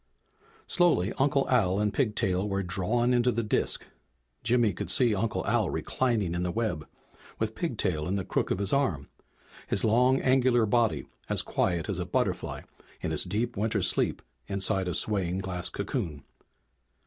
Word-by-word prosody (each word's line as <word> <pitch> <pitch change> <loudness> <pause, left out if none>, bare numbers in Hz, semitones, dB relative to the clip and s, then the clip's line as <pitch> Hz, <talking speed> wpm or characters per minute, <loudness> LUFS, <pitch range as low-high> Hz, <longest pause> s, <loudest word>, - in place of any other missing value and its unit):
Slowly 165 - +2
Uncle 140 0 +2
Al 100 -7 +2
and 105 -1 0
Pigtail 105 -6 0
were 100 0 -1
drawn 105 +7 +1
into 125 0 +3
the 115 0 -1
disk. 105 - 0 0.6
Jimmy 115 -2 +3
could - - -5
see 120 -4 +3
Uncle 110 +2 -1
Al - - +1
reclining 115 -9 -1
in 85 - -2
the 90 - -1
web, 90 -6 -2 0.5
with 110 0 -2
Pigtail 100 - -2
in 95 - -1
the 95 -2 -2
crook - - -1
of - - 0
his 100 0 0
arm, 130 - 0 0.6
his - - +1
long, 125 +4 +4
angular 130 -3 +3
body 115 +1 +1 0.2
as - - +1
quiet 85 -3 0
as - - -2
a - - -2
butterfly - - -1 0.4
in - - -2
its - - 0
deep 110 +6 -2
winter 105 -1 0
sleep 90 - +1 0.2
inside 95 -1 0
a 90 - -1
swaying 95 -4 0
glass 90 -2 -3
cocoon. 75 -4 -4
105 Hz, 160 wpm, -28 LUFS, 95-120 Hz, 0.6 s, long